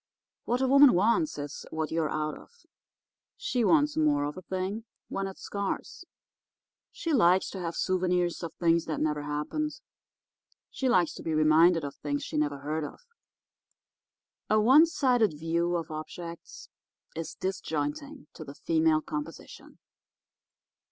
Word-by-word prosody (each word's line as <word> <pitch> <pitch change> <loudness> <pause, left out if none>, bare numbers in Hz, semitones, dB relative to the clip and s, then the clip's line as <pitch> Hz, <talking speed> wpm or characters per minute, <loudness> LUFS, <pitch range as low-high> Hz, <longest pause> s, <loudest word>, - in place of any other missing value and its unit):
What 245 +2 0
a 265 - +2
woman 275 0 +7
wants 235 - +2
is 145 0 -6
what 160 -1 -3
you're 160 -2 0
out 155 0 -2
of. 475 0 -17 0.7
She 255 - -1
wants 295 +3 +3
more 150 -2 +2
of 145 0 -3
a 185 - -8
thing 190 +4 -4 0.2
when 195 0 -2
it's 190 - -10
scarce. 200 -1 -4 0.9
She 330 - -3
likes 185 -7 +4
to 195 - -6
have 170 -2 -4
souvenirs 180 -1 0
of 170 -2 -5
things 165 -1 +2
that 155 - -3
never 150 -1 0
happened. 150 - -3 0.9
She 265 - -1
likes 180 -9 +3
to - - -9
be 160 -1 -2
reminded 160 +2 +5
of 140 -1 -5
things 145 -1 -3
she - - -6
never 145 -2 -1
heard 155 +2 -2
of. 145 - -8 1.5
A 215 - +4
one 265 +9 +7
sided 245 - +2
view 170 +2 0
of 165 -2 -3
objects 170 +2 -8 0.5
is 165 0 -5
disjointing 190 - -4
to 160 - -9
the 140 -1 -10
female 160 -1 +2
composition. 150 +1 -8
170 Hz, 145 wpm, -28 LUFS, 155-215 Hz, 1.5 s, woman